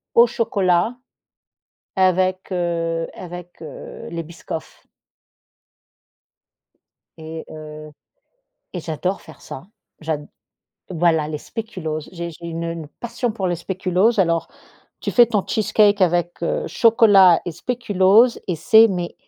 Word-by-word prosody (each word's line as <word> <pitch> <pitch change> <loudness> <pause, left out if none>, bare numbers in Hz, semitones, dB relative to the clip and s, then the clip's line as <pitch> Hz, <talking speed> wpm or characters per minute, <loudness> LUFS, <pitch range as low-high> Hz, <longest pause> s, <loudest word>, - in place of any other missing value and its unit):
au 235 - +8
chocolat 200 -1 +1 1.0
avec 185 0 +1
heu 165 -2 -1
avec 175 0 -10
heu, 155 -4 -9
les 170 0 -4
Biscoffs. 165 0 -9 2.3
Et 160 0 -8
heu, 155 0 -10 0.8
et 180 - -3
j'adore 175 +4 -3
faire 160 -4 -15
ça, 135 - -9 0.4
j'ad 155 -2 -4 0.6
voilà, 160 -3 +2
les 150 -1 -5
spéculos, 185 -9 -5
j'ai 170 -1 -5
j'ai 170 +2 -11
une 165 0 -4
une 165 -2 -5
passion 240 - -4
pour 195 -4 -3
les 175 - 0
spéculos 190 +5 0
alors 170 -3 +1 0.5
tu - - -2
fais 240 -1 +6
ton 215 -4 -1
cheesecake 210 -1 +2
avec 175 -1 +1
heu, 170 - -1
chocolat 205 -6 +5
et 175 - -4
spéculos 210 +2 +3 0.2
et 180 - 0
c'est 220 +6 +6
mais 175 -3 -3
175 Hz, 120 wpm, -21 LUFS, 165-200 Hz, 2.3 s, au